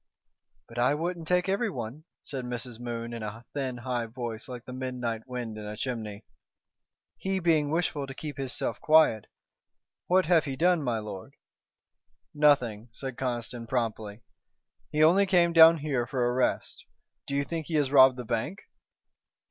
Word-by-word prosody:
"But 115 +1 -7
I 125 +4 +3
wouldn't 170 +1 -3
take 180 +1 +2
everyone," 155 - -2 0.2
said 135 -2 -5
Mrs. 125 -1 -5
Moon 120 -1 -5
in 115 - -5
a 110 +2 -7
thin, 130 -3 -3
high 120 -1 -2
voice 115 -1 -6
like 125 -2 -8
the 125 - -8
midnight 125 -3 -4
wind 120 -4 -5
in 105 - -7
a 105 0 -6
chimney. 110 -4 -4 0.9
"He 190 0 -1
being 160 -4 +2
wishful 155 -3 -1
to 135 - -8
keep 150 -2 -7
hisself 135 -2 -3
quiet. 155 -9 +4 0.8
What 185 +1 +4
have 165 -2 +4
he 135 -2 -3
done, 175 +3 +3
my 120 -5 -1
lord?" 105 -3 -8 1.0
"Nothing," 125 -7 +2
said 135 +1 -6
Conniston, 120 -2 -4
promptly. 115 -3 -3 0.7
"He 150 +1 +3
only 190 +5 +5
came 175 -3 +3
down 165 0 +9
here 140 -6 -1
for 125 -1 0
a 120 - +1
rest. 130 0 -1 0.4
Do 140 - -3
you 140 - +1
think 160 +1 -5
he 165 - -2
has 145 -3 +2
robbed 130 -2 +7
the 125 - -6
bank?" 120 - -2
130 Hz, 165 wpm, -28 LUFS, 115-155 Hz, 1.0 s, down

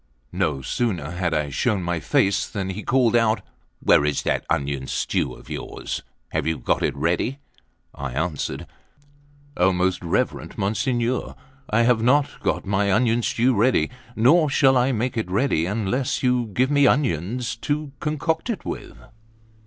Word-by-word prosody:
No 70 -4 -1
sooner 90 - -2
had 90 -1 -1
I 75 -3 -1
shown 100 - 0
my 85 -1 -1
face, 95 +6 +1
than 95 -2 -3
he 100 +3 -5
called 120 0 +2
out: 115 -1 +2 0.4
"Where - - +5
is 75 -1 0
that - - -1
onion 70 -2 -1
stew - - -1
of - - -16
yours? - - -5 0.3
Have - - -2
you 80 -1 0
got - - 0
it - - 0
ready?" 85 - 0 0.6
I 70 -3 -5
answered: 75 0 -2 0.9
"O 95 -5 +3
most 90 0 0
reverend 95 +9 -2
Monsignor, 120 +4 -1 0.3
I 110 +2 +3
have 120 -1 +3
not 140 +5 +2
got - - -1
my 100 0 +1
onion 120 +3 +2
stew 120 +2 +2
ready, 125 +5 +2 0.2
nor 150 +8 +4
shall 135 -1 +4
I 125 +1 +3
make 120 +1 -1
it 110 -5 -2
ready, 95 - +1
unless 115 +8 -1
you 125 -2 +2
give 125 +6 0
me 145 -1 +5
onions 120 - 0
to 145 +3 -2
concoct 155 - -1
it 225 - -3
with." - - -6
110 Hz, 160 wpm, -23 LUFS, 90-125 Hz, 0.9 s, Where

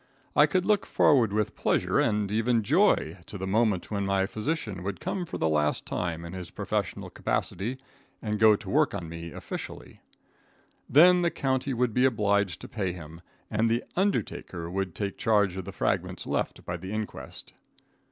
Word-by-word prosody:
I - - +7
could 185 -2 +1
look 210 0 +2
forward 125 -8 +4
with 105 0 -1
pleasure, - - +1
and 105 -1 +1
even 115 +1 +2
joy, 135 - +3
to 105 - -6
the 95 - -4
moment 105 -1 +1
when 100 -1 -1
my 95 -1 +1
physician 110 - -3
would 95 -1 -4
come 180 -3 -3
for - - -5
the 80 - +1
last 75 -1 +1
time 85 -1 -3
in 85 - -8
his 90 -2 -6
professional - - -3
capacity 115 +8 -2 0.4
and 105 -1 -2
go 110 -1 +7
to - - -10
work - - +2
on 85 - -5
me 85 +1 -7
officially. - - -8 0.9
Then 180 +6 +7
the 170 - +3
county 135 -3 -1
would 120 -1 +1
be 125 +3 +3
obliged 100 -6 +1
to - - -8
pay 95 -5 -2
him, 80 -1 -10 0.3
and 110 +2 +2
the 115 +2 +1
undertaker 95 - -1
could 95 -2 -2
take 100 -1 -4
charge 105 -4 +2
of 95 -2 -5
the - - -6
fragments - - -1
left - - -2
by 85 - -3
the 95 +3 -7
inquest. 110 0 -6
105 Hz, 180 wpm, -28 LUFS, 95-125 Hz, 0.9 s, I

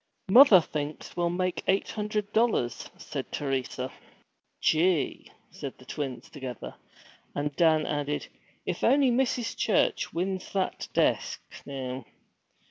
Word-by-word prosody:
'Mother 225 -4 +9
thinks 150 -1 -5
we'll 175 -1 +1
make 180 +1 -1
eight 195 +1 +2
hundred 210 -1 -3
dollars,' 220 - +1
said - - -6
Teresa. 130 -2 -2 0.7
'Gee!' 165 0 +1 0.2
said - - -7
the - - -16
twins 130 -5 -5
together; 130 -6 -7 0.6
and 145 0 -2
Dan 160 -2 +4
added, 145 0 -2 0.4
'If - - -3
only 275 -2 +5
Mrs. 245 -1 0
Church - - +1
wins 185 +2 -3
that 190 -2 -1
desk, - - +1 0.3
now!' 130 -2 -5
165 Hz, 120 wpm, -28 LUFS, 140-200 Hz, 0.7 s, Mother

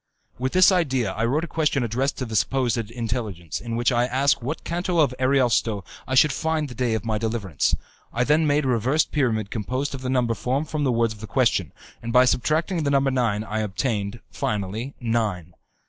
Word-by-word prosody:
With 130 +1 -2
this 185 +1 +6
idea 135 - +1
I 115 +4 -1
wrote 145 +7 +1
a - - -3
question 150 -5 0
addressed 125 +5 -1
to 130 - -3
the 110 -2 -6
supposed 125 +2 +1
Intelligence, 115 - -4
in 115 -1 -4
which 120 +2 +2
I 120 0 +2
ask 135 +2 +2
in 120 - -6
what 155 - -4
canto 175 +1 -2
of 145 -5 +3
Ariosto 125 -6 +2 0.2
I 130 - -1
should 150 +3 +6
find 160 +1 -1
the 125 - -9
day 120 -1 0
of 110 - -4
my 110 -2 -1
deliverance. 110 -7 0 0.4
I 120 - +1
then 150 +4 +3
made 145 0 +2
a - - 0
reversed 130 +5 +1
pyramid 110 -8 0
composed 130 +6 -2
of 135 - -6
the 130 - -3
number 125 -3 +1
formed 135 +7 -2
from 155 -2 -2
the 130 - +2
words 115 -1 +1
of 110 - -15
the 110 - -7
question, 100 - +1 0.3
and 115 - -4
by 125 +2 +6
subtracting 160 +8 +1
the 145 - 0
number 140 -1 +2
nine 115 -5 0
I 110 0 -3
obtained, 105 0 -2
finally, 105 +6 -3
nine. 110 -8 -1
125 Hz, 210 wpm, -24 LUFS, 110-140 Hz, 0.4 s, this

